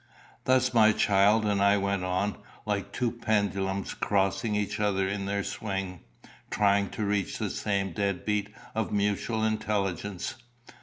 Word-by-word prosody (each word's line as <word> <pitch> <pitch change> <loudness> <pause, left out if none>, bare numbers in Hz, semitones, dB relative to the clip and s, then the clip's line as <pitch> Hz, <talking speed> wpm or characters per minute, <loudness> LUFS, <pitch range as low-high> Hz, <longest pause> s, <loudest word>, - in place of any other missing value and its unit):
Thus 130 0 +3
my 110 -2 +6
child 105 +2 +4
and 100 -1 +1
I 100 +1 +5
went 100 -1 -1
on, 95 +3 -1 0.3
like 100 -2 -2
two 120 +2 0
pendulums 100 -4 -1
crossing 100 +2 0
each 105 -1 -1
other 100 -2 +1
in 100 0 -3
their 100 0 -1
swing, 95 -4 -4 0.5
trying 100 -1 +2
to 110 - -3
reach 100 -2 -1
the - - -2
same 100 -2 -1
dead 100 -1 -1
beat 105 -1 0 0.2
of 110 -1 -2
mutual 105 +2 0
intelligence. 105 0 -2
100 Hz, 145 wpm, -28 LUFS, 100-105 Hz, 0.5 s, my